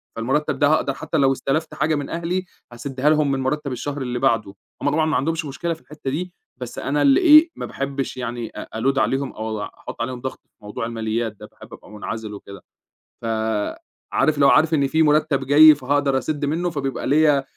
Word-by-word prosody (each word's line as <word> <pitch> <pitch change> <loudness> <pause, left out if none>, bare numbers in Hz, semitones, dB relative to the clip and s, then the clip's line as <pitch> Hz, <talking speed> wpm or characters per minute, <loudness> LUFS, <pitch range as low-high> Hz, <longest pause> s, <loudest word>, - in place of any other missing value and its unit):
فالمُرتَّب 135 +7 -1
ده 145 - +4
هاقدر 145 -2 +2
حتّى 160 - -3
لو 135 -2 +4
استَلَفت 140 +4 -2
حاجة 155 +2 +1
من 145 -1 -4
أهلي 175 +3 -2 0.3
هاسِدّها 135 +3 -1
لهم 150 -2 +3
من 135 - 0
مُرتَّب 140 +2 -2
الشهر 145 +3 -4
اللي 125 -1 -3
بعده. 110 -5 +1 0.3
هم - - +1
طبعًا 155 +2 +1
ما 155 - 0
عندهمش 160 +4 -1
مشكلة 165 +4 -3
في 160 - -13
الحتّة 150 -2 -7
دي، 175 +5 -4 0.3
بس 125 - -6
أنا 145 +1 -1
اللي 275 +3 +5
إيه، 315 -1 +8
ما - - -5
باحبش 140 -1 -4
يعني 120 -2 -4
أ - - -6 0.2
أload 135 +2 +1
عليهم 135 0 0
أو 110 - -6
وع 105 -1 -5
أحُط - - -8
عليهم 125 +1 -4
ضغط 130 0 -5
في - - -53
موضوع 105 +2 -5
الماليات 115 -1 -2
ده. - - -11
باحب - - -15
أبقى - - -13
مُنعَزِل 105 0 -6
وكده. 100 -1 -10 0.6
ف - - -8 0.9
عارف 155 - +2
اللي 140 -1 +3
هو - - +7
عارف 160 +3 +4
إن 140 -3 +3
في 160 +4 +2
مُرتَّب 150 -2 +2
جاي 155 +2 +8
فهأقدر 140 0 0
أسِد 145 +2 -2
منّه، 165 +5 -1
فبيبقى 140 -5 -3
ليّا 150 -1 +4
أ - - -6
140 Hz, 210 wpm, -22 LUFS, 125-155 Hz, 0.9 s, إيه